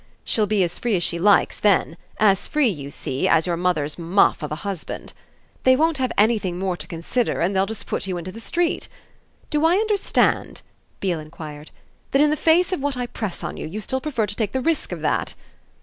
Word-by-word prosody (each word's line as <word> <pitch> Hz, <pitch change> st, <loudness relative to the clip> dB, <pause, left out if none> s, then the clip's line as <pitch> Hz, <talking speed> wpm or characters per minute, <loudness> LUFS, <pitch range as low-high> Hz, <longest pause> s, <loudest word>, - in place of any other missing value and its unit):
She'll 215 Hz, -2 st, +1 dB
be 205 Hz, -2 st, +2 dB
as 175 Hz, -, -2 dB
free 235 Hz, -4 st, +1 dB
as 175 Hz, -, 0 dB
she 170 Hz, -, -1 dB
likes 200 Hz, +3 st, +3 dB
then 195 Hz, -5 st, +3 dB, 0.2 s
as 200 Hz, -2 st, +3 dB
free, 300 Hz, -5 st, +2 dB
you 145 Hz, -8 st, -5 dB
see, 135 Hz, -1 st, -2 dB
as 165 Hz, -1 st, +4 dB
your 175 Hz, -2 st, 0 dB
mother's 170 Hz, -3 st, -1 dB
muff 175 Hz, +4 st, +3 dB
of 150 Hz, -, -5 dB
a -, -, -1 dB
husband. 195 Hz, -5 st, -5 dB, 0.5 s
They 260 Hz, 0 st, +5 dB
won't 315 Hz, +1 st, +1 dB
have 255 Hz, -2 st, 0 dB
anything 205 Hz, -4 st, +2 dB
more 185 Hz, -1 st, -1 dB
to -, -, -9 dB
consider 185 Hz, +7 st, -1 dB
and 180 Hz, +4 st, +1 dB
they'll 190 Hz, +1 st, +2 dB
just 220 Hz, 0 st, -6 dB
put -, -, -3 dB
you 185 Hz, -2 st, -2 dB
into 175 Hz, +2 st, -6 dB
the 225 Hz, -, -10 dB
street. 340 Hz, +8 st, -1 dB, 0.6 s
Do 300 Hz, 0 st, +1 dB
I 330 Hz, +2 st, +5 dB
understand," 420 Hz, -1 st, +1 dB, 0.4 s
Beale 180 Hz, -4 st, 0 dB
enquired, 155 Hz, -1 st, -9 dB, 0.4 s
"that, 275 Hz, -, +5 dB
in 300 Hz, -, +4 dB
the -, -, +2 dB
face 335 Hz, +4 st, +3 dB
of 370 Hz, -, -1 dB
what 280 Hz, -2 st, -1 dB
I 245 Hz, -, -1 dB
press 220 Hz, -5 st, -5 dB
on -, -, -4 dB
you, -, -, -5 dB
you 195 Hz, +7 st, -5 dB
still 260 Hz, +5 st, -2 dB
prefer 260 Hz, -7 st, -1 dB
to 205 Hz, 0 st, -5 dB
take 215 Hz, -3 st, -2 dB
the 260 Hz, -, +1 dB
risk 320 Hz, -5 st, 0 dB
of 175 Hz, -3 st, -5 dB
that?" 155 Hz, -, -1 dB
205 Hz, 220 wpm, -22 LUFS, 175-260 Hz, 0.6 s, They